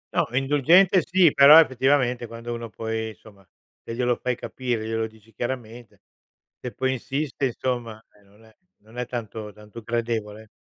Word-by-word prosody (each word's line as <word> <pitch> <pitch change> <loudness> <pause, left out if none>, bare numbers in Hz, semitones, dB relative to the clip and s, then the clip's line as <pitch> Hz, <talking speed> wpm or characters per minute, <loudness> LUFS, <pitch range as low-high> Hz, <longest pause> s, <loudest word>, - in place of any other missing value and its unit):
No, - - +2
indulgente, 150 +8 +4
sì. 175 -3 +4
Però 140 +3 +9
effettivamente 130 -3 +2
quando 115 +1 -7
uno 115 0 -6
poi 110 0 -4
insomma 100 -1 -16 0.4
te 115 - -7
glielo 120 0 +1
fai 125 0 -2
capire, 120 -3 -4
glielo 110 0 -2
dici 110 0 -21
chiaramente. 120 -1 -6 0.6
Se 125 - -5
poi 130 0 -1
insiste 135 +3 -3
insomma, 120 -3 -4 0.2
eh, 100 - -25
non 105 +3 -22
è 110 -1 -22 0.3
non 110 +3 -16
è 125 - -3
tanto 110 -3 -6
tanto 105 +2 -13
gradevole. 110 -2 -4
120 Hz, 160 wpm, -24 LUFS, 110-130 Hz, 0.6 s, Però